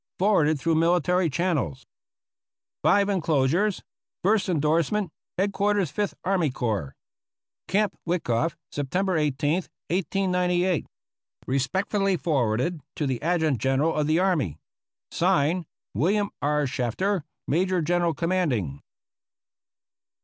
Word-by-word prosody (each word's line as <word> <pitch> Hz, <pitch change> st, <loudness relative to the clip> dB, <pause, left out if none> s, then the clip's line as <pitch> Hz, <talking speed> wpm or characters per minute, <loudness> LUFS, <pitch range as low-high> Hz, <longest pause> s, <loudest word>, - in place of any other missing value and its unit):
Forwarded 160 Hz, -7 st, +3 dB
through 165 Hz, +3 st, +1 dB
military 175 Hz, +2 st, +2 dB
channels. 155 Hz, -, -1 dB, 1.0 s
(S 200 Hz, 0 st, +4 dB
enclosures.) 175 Hz, +1 st, +1 dB, 0.4 s
First 200 Hz, +1 st, +2 dB
Endorsement. 165 Hz, +4 st, +1 dB, 0.3 s
Head 200 Hz, +2 st, +1 dB
quarters 200 Hz, -4 st, +1 dB
Fifth 205 Hz, -2 st, -2 dB
Army 180 Hz, -5 st, +1 dB
Corps. 110 Hz, -, -2 dB, 0.7 s
Camp 205 Hz, +2 st, +1 dB
Wikoff, 165 Hz, -3 st, 0 dB, 0.2 s
September 180 Hz, +7 st, -1 dB
i8, 150 Hz, -3 st, +1 dB, 0.6 s
1898. 180 Hz, -1 st, +1 dB, 0.6 s
Respectfully 190 Hz, +9 st, 0 dB
forwarded 140 Hz, +1 st, 0 dB
to 150 Hz, -, -1 dB
the 130 Hz, -3 st, -2 dB
Adjutant 160 Hz, -5 st, +1 dB
General 135 Hz, +7 st, +1 dB
of 150 Hz, -1 st, 0 dB
the 155 Hz, +1 st, +3 dB
Army. 160 Hz, -, +1 dB, 0.5 s
(Signed) 175 Hz, -1 st, +1 dB, 0.3 s
William 200 Hz, +6 st, +1 dB
R. 150 Hz, 0 st, +1 dB
Shafter, 140 Hz, -, -1 dB, 0.2 s
Major 180 Hz, +3 st, +1 dB
General 175 Hz, 0 st, +1 dB
Commanding. 135 Hz, -, -1 dB
170 Hz, 100 wpm, -25 LUFS, 145-185 Hz, 1.0 s, S